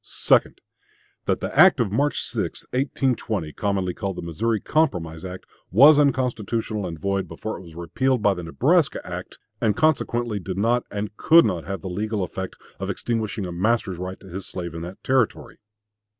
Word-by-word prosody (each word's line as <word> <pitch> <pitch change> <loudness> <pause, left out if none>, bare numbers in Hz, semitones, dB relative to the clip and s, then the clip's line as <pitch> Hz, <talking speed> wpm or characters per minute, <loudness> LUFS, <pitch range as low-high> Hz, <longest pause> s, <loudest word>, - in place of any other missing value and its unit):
2d. - - +2 0.7
That - - 0
the - - -4
act 185 -6 +7
of 110 -5 +1
March 145 +7 +1
6, - - -4
1820, 125 - -1
commonly 100 -3 -1
called 100 -1 -4
the - - -5
Missouri 105 +7 -1
Compromise 90 - 0
act, 90 0 -7 0.2
was 145 - +7
unconstitutional 115 -6 0
and 85 -2 -6
void 100 +3 -1
before 110 - -5
it - - -9
was 85 -3 -13
repealed 120 +8 0
by 100 - +4
the 90 - -6
Nebraska 140 - +2
act, - - -7 0.2
and 105 -2 +2
consequently 120 -8 +1
did 95 0 -5
not 115 +4 +1
and 105 +1 -4
could 165 +1 +6
not 90 -6 -1
have 95 0 -4
the - - -4
legal 105 +2 -2
effect 95 +1 -5 0.2
of - - -3
extinguishing 110 -3 -2
a 90 - -5
master's 95 0 0
right 95 +1 -5
to 95 - -13
his 95 +1 -7
slave 85 -3 -5
in 80 - -6
that 90 +3 -8
Territory. 130 -4 0
105 Hz, 180 wpm, -24 LUFS, 90-120 Hz, 0.7 s, act